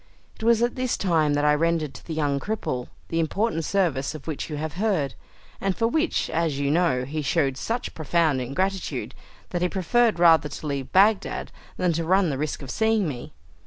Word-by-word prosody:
It - - -16
was 230 0 +4
at 240 - +1
this 255 -1 -1
time 160 -6 +2
that 145 0 +1
I 150 - +5
rendered 160 -1 0
to - - -11
the 160 - -5
young 145 -3 0
cripple 140 - -3 0.2
the 165 - 0
important 165 +2 0
service 160 -8 0
of 150 - -9
which 155 -1 -4
you 150 - -4
have 155 0 -4
heard, 180 -12 +1 0.5
and 195 -1 0
for 230 - +2
which, 315 +7 0
as 160 -3 0
you 140 0 0
know, 150 -7 +2
he 155 +3 -3
showed 140 -2 +1
such 230 - -3
profound 160 -3 +1
ingratitude, 185 +10 -2 0.4
that 175 - -2
he 180 - +2
preferred 225 +5 +2
rather 165 -3 +5
to - - -8
leave 140 -3 -3
Bagdad 200 +2 +3 0.3
than 180 -2 +1
to 165 +1 -1
run 185 0 +3
the 135 - -3
risk 150 -1 -3
of 130 - -6
seeing 220 -3 +2
me. 125 -5 -6
165 Hz, 200 wpm, -25 LUFS, 145-195 Hz, 0.5 s, I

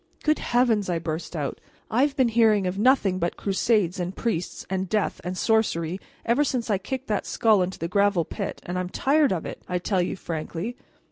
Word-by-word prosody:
"Good 305 0 +2
Heavens!" 235 -5 +2
I 175 - +1
burst 165 +1 -4
out, 145 -4 -3 0.3
"I've 270 +5 +2
been 260 -4 +3
hearing 220 -3 +4
of 185 +2 -2
nothing 210 -6 +3
but 170 0 -1
crusades 195 -2 +1
and 180 +2 -3
priests 180 -7 -3
and 190 -1 -2
death 215 -2 0
and 180 +1 -4
sorcery 185 -6 +1 0.3
ever 240 +5 +3
since 250 -5 -1
I 200 - +2
kicked 260 +7 -4
that 210 - -1
skull 220 -5 +3
into 180 +1 -2
the 165 - -3
gravel 200 -2 +2
pit, - - -5
and 180 +1 -2
I - - +1
am 180 - -4
tired 285 +7 +2
of 175 -4 -2
it, - - -7
I 180 - 0
tell 185 +1 0
you 175 - -1
frankly. 170 +6 -4
195 Hz, 205 wpm, -25 LUFS, 180-230 Hz, 0.3 s, hearing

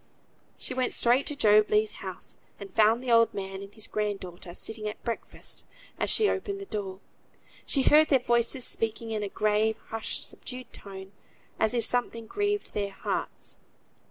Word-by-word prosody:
She - - -5
went 255 -1 0
straight 245 +3 +3
to 295 - +2
Job 210 -4 +5
Legh's 210 0 +3
house, 190 -2 -7 0.2
and 195 -2 -9
found 225 +3 +4
the 250 - -1
old 230 0 +5
man 195 0 -4
and 200 0 -9
his 220 +1 -3
grand 210 -2 -1
daughter 175 -1 -8
sitting 220 -1 -1
at 210 - -6
breakfast; 235 -1 -4 0.4
as - - +1
she 430 - +5
opened 395 0 -2
the 395 - -6
door 200 - -5 0.7
she 275 - +2
heard 310 +3 +6
their 275 - +6
voices 240 +1 +1
speaking 225 0 0
in 215 -1 -1
a 205 - -2
grave, 215 +1 +2
hushed, 225 0 -1
subdued 255 0 -7
tone, 190 -1 -9 0.5
as 220 +2 +3
if 235 -2 +1
something 230 -2 -1
grieved 410 - -1
their 200 -1 -1
hearts. - - -4
220 Hz, 175 wpm, -28 LUFS, 205-250 Hz, 0.7 s, heard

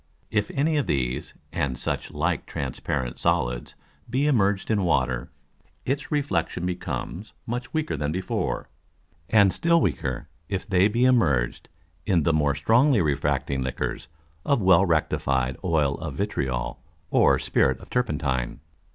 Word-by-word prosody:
If 105 -1 +1
any 150 +3 +2
of 145 - 0
these, 65 -2 -1 0.2
and 65 -4 -1
such - - -3
like - - -1
transparent 65 -4 -3
Solids, - - 0 0.3
be 130 +4 +1
immerged 105 -8 +2
in 105 -3 +2
Water, 65 -7 +1 0.6
its 140 +3 -2
Reflexion 145 - -1
becomes, 90 +2 -4
much 120 +3 -4
weaker 155 - -1
than 75 0 -2
before; 95 +3 -2 0.6
and 100 -4 +5
still 170 0 +3
weaker 80 - -1 0.2
if 95 -2 -3
they 95 +1 +4
be 115 +3 -1
immerged 80 - +2 0.4
in 85 -5 +3
the 80 - +2
more 75 -2 +2
strongly 115 - +4
refracting 70 -3 0
Liquors 65 -1 -3 0.4
of 140 - +2
well 95 -1 +5
rectified 65 -5 +1
Oil 75 -6 +1
of 80 -4 -5
Vitriol 65 - -2 0.3
or - - +5
Spirit - - +1
of - - -14
Turpentine. 70 - -1
85 Hz, 135 wpm, -25 LUFS, 70-110 Hz, 0.6 s, and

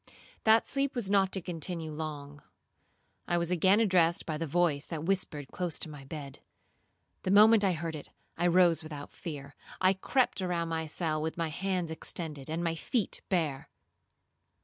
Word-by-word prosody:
That 220 +1 +5
sleep 275 0 0
was 215 -6 -1
not 195 -2 +3
to 190 - 0
continue 165 -1 -3
long. 145 -2 -6 0.9
I 175 - +1
was 170 0 0
again 190 +4 +4
addressed 180 -6 +3
by 160 - -2
the 165 - -2
voice 150 -2 +1
that 160 -3 -4
whispered 165 -6 -2
close 175 -3 -2
to 155 - -3
my 140 -2 -10
bed. 140 -2 -7 0.8
The - - -3
moment 210 +2 +7
I 190 -2 +3
heard 165 0 -4
it, 145 - -9 0.3
I 175 - +1
rose 175 -1 +4
without 150 -2 -8
fear. 145 -3 -7 0.3
I 185 +1 +4
crept 200 +2 +1
around 175 -2 -1
my 160 -1 -2
cell 155 -1 -1
with 160 +2 -3
my 165 -1 -1
hands 180 0 -2
extended, 155 -3 -4
and 165 +2 -2
my 165 -1 0
feet 205 +6 -2
bare. 160 -8 -1
170 Hz, 170 wpm, -30 LUFS, 155-185 Hz, 0.9 s, moment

